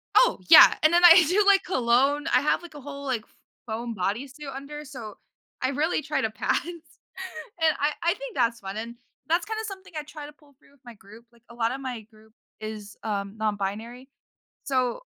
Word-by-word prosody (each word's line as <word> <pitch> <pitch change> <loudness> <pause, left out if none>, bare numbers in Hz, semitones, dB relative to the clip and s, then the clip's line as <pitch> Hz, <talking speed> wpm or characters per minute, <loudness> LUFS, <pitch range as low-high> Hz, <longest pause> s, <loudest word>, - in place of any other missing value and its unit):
Oh, - - +5
yeah, - - +9
and 310 +2 +5
then 345 - +5
I 345 0 +9
do 390 +5 +3
like 400 -1 +5
cologne 275 0 +1
I - - +5
have 300 - +1
like 345 -3 -13
a 290 - -9
whole, 280 0 -8
like, 255 -5 -1
f - - -28 0.4
foam 230 +1 -4
body 210 +7 -2
suit 290 +2 -11
under, 295 +2 -8
so 245 -7 -9 0.5
I 260 - +1
really 305 +4 0
try 305 +1 -2
to 220 - 0
pass. 215 +1 0
And 340 -1 -5
I 290 +2 +1
I 340 - +3
think - - -9
that's 235 -1 +1
fun, 195 +1 -7
and 230 +2 -6 0.3
that's 335 +2 +1
kind 440 0 -4
of 445 - -4
something 385 -2 -10
I 300 - -3
try 300 0 -10
to 295 - -10
pull 295 -2 -25
through - - -25
with 280 -2 -28
my 240 - -10
group, 210 +4 -16
like, 235 -1 -26
a 235 - -13
lotta 235 +2 -1
my 255 -4 -5
group 220 0 -22 0.3
is, 215 -1 -8
um, 200 -2 -3
non 215 -1 0
binary. 225 +7 -6 0.5
So 255 - -1
270 Hz, 215 wpm, -26 LUFS, 225-310 Hz, 0.5 s, yeah